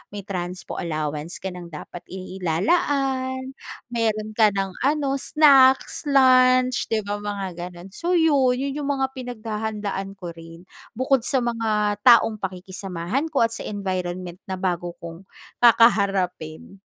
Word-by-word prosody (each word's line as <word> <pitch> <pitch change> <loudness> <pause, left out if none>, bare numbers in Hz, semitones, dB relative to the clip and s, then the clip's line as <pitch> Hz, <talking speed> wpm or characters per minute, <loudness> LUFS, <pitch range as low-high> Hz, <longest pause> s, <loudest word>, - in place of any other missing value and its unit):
may 200 - -6
transpo 180 -1 -5
allowance 155 0 -3
ka 190 - -3
ng 180 -1 -9
dapat 170 +2 -9
ilalaan, 260 - -1 0.4
meron 215 -2 -1
ka 215 -2 +3
ng 195 -1 -1 0.2
ano, 280 -2 0
snacks, 275 -1 +4
lunch 255 -2 +4
'di 220 -1 -1
ba? 205 +1 -4
Mga 205 -2 -4 0.3
ganun. 175 +2 -11
So 345 - -1
yun, 280 -7 +3
yun 275 +2 -2
yung 285 - -3
mga 265 0 -1
pinaghahandaan 215 -5 -5
ko 180 -3 -7
rin, 165 +1 -13 0.3
bukod 260 -1 +1
sa 260 -3 +2
mga 215 -3 0
taong 225 -2 +6
pakikisamahan 190 - -4
ko, 290 -7 +1
at 230 - +1
sa - - -6
environment 185 -3 -4
na 190 - -3
bago 175 -2 -3
kong 170 +3 -11 0.3
kakaharapin. 195 -7 +2
210 Hz, 135 wpm, -23 LUFS, 185-255 Hz, 0.4 s, taong